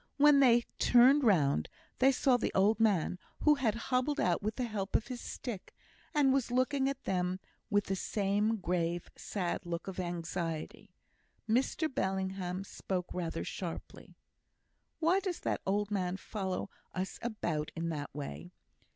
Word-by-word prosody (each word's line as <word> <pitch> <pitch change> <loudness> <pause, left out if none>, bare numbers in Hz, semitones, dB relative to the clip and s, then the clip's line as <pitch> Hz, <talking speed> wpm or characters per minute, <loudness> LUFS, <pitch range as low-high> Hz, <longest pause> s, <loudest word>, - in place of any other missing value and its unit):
When 290 0 +7
they 240 -3 +6 0.2
turned 260 +4 +6
round 145 - +3 0.3
they 265 +1 +6
saw 260 -1 +3
the 245 - 0
old 205 +4 +4
man, 190 -5 +2 0.2
who 300 - +6
had 255 -7 +1
hobbled 255 +4 0
out 180 +1 +2
with 215 +1 -2
the 255 - -2
help 205 -4 -3
of 225 - +1
his 250 -1 -5
stick, 230 -8 -6 0.4
and 280 -3 +4
was 270 -3 +1
looking 260 +2 +2
at 275 0 -5
them 180 0 -1 0.3
with 205 -2 +3
the 195 - -2
same 205 +3 +1
grave, 175 -2 -1
sad 185 -3 -3
look 175 0 -4
of 190 -1 -5
anxiety. 170 -2 -4 0.5
Mr 260 +7 +1
Bellingham 190 -5 -2
spoke 185 -2 -4
rather 165 -2 -3
sharply: 175 -3 -7 0.8
"Why 340 +4 +3
does 370 -3 -3
that - - -1
old 205 +1 0
man 185 -2 -1
follow 190 -1 -4 0.2
us 185 0 -3
about 170 -10 -2
in 165 0 -2
that 145 -3 -4
way? 145 +4 -6
200 Hz, 150 wpm, -32 LUFS, 180-250 Hz, 0.8 s, When